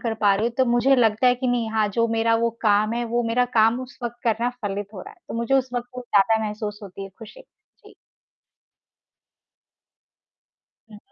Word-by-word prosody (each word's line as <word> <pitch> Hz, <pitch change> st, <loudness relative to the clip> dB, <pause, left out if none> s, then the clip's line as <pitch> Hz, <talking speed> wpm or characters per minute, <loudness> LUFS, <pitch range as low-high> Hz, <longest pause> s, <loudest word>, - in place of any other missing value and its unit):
कर 230 Hz, -2 st, -2 dB
पा 200 Hz, -2 st, +4 dB
रही 215 Hz, +3 st, 0 dB
हूँ, 235 Hz, -, -4 dB
तो 260 Hz, -, +5 dB
मुझे 240 Hz, +3 st, +3 dB
लगता 225 Hz, 0 st, +3 dB
है 250 Hz, -, +5 dB
कि 255 Hz, +1 st, -4 dB
नहीं 240 Hz, -3 st, 0 dB
हाँ, 220 Hz, -1 st, +1 dB
जो 230 Hz, +3 st, +1 dB
मेरा 225 Hz, 0 st, +1 dB
वो 230 Hz, +1 st, +1 dB
काम 215 Hz, +1 st, +3 dB
है, 240 Hz, 0 st, -1 dB
वो 235 Hz, +1 st, -1 dB
मेरा 245 Hz, +2 st, +2 dB
काम 225 Hz, +3 st, +4 dB
उस 255 Hz, +1 st, -10 dB
वक़्त 240 Hz, 0 st, -4 dB
करना 235 Hz, +1 st, +1 dB
फलित 205 Hz, 0 st, -3 dB
हो 190 Hz, -, -7 dB
रहा -, -, -10 dB
है। -, -, -33 dB
तो -, -, -6 dB
मुझे 235 Hz, +3 st, 0 dB
उस 260 Hz, -2 st, +1 dB
वक़्त 245 Hz, 0 st, -3 dB
बहुत 250 Hz, -1 st, -7 dB
ज़्यादा 220 Hz, +1 st, +2 dB
महसूस 210 Hz, 0 st, -5 dB
होती 195 Hz, 0 st, -9 dB
है -, -, -8 dB
ख़ुशी। 230 Hz, -, -12 dB
जी। -, -, -22 dB, 3.0 s
हुँ। 210 Hz, -, -12 dB
230 Hz, 205 wpm, -23 LUFS, 215-245 Hz, 3.0 s, तो